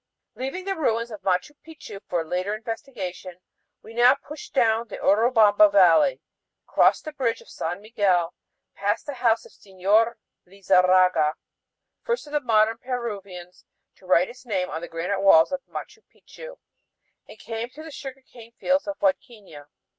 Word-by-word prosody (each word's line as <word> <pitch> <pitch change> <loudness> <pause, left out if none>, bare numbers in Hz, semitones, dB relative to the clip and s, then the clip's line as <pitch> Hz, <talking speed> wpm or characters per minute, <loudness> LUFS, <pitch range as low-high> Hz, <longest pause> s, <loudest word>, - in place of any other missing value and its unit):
Leaving 270 +9 -5
the 390 - -1
ruins 230 -7 -1
of 210 - -8
Machu 185 +8 0
Picchu 310 -10 -11
for 170 -2 -1
later 180 +5 -2
investigation, 215 -6 -7 0.4
we 225 - -12
now 245 +3 +5
pushed 290 0 -11
on 255 - +6
down 225 +1 0
the 205 - -8
Urubamba 210 -1 +4
Valley, 200 - +5 0.5
crossed - - +3
the 310 - -6
bridge 235 -5 -1
of - - -16
San 175 +4 -4
Miguel, 195 -6 0 0.4
passed 205 +3 -2
the 290 - -5
house 235 -3 +1
of - - -16
Señor 205 +4 +1 0.3
Lizarraga, 185 -4 +3 0.7
first 475 -7 -2
of 295 0 -2
modern 225 -1 +2
Peruvians 200 -8 -6 0.3
to 185 - -19
write 180 0 +4
his 250 - -13
name 190 -7 -2
on 160 - -4
the 170 - -6
granite 180 +4 -3
walls 165 -2 +6
of 275 -1 -3
Machu 430 - -8
Picchu, - - -13 0.7
and - - -12
came 230 +1 -6
to 300 +5 -12
the 320 - -10
sugar 270 -2 -9
cane 235 -2 -16
fields 280 +2 +1
of 300 - -4
Huadquiña. 215 - -3
220 Hz, 160 wpm, -24 LUFS, 185-260 Hz, 0.7 s, on